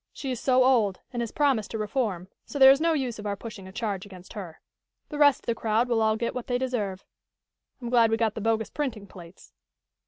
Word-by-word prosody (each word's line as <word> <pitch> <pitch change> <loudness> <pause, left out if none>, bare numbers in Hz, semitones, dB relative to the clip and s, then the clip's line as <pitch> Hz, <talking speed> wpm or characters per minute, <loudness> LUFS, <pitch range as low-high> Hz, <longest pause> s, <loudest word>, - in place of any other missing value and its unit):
She 270 - -5
is 250 - -3
so 255 0 +3
old, 230 -7 +3
and 240 - -2
has 235 - -3
promised 270 -8 +1
to - - -4
reform, 210 -4 -2 0.2
so - - -7
there 265 -1 +9
is 275 +2 +3
no 330 0 +3
use 255 -7 -2
of 210 - -5
our 200 - -1
pushing 200 -2 -9
a - - -10
charge 205 -3 -3
against 185 -3 -12
her. 180 -6 -8 0.5
The 295 - -6
rest 285 -2 +5
of - - -24
the 235 - +1
crowd 225 +1 0
will 235 -2 +1
all 220 0 +3
get 235 +1 -2
what 250 - -6
they 245 - 0
deserve. 220 -7 -3 0.7
I'm 240 -2 -6
glad 235 -2 +5
we 225 - +1
got 225 -2 +1
the 220 - -6
bogus 220 0 0
printing 245 -9 -3
plates." 175 - -14
225 Hz, 240 wpm, -26 LUFS, 205-255 Hz, 0.7 s, there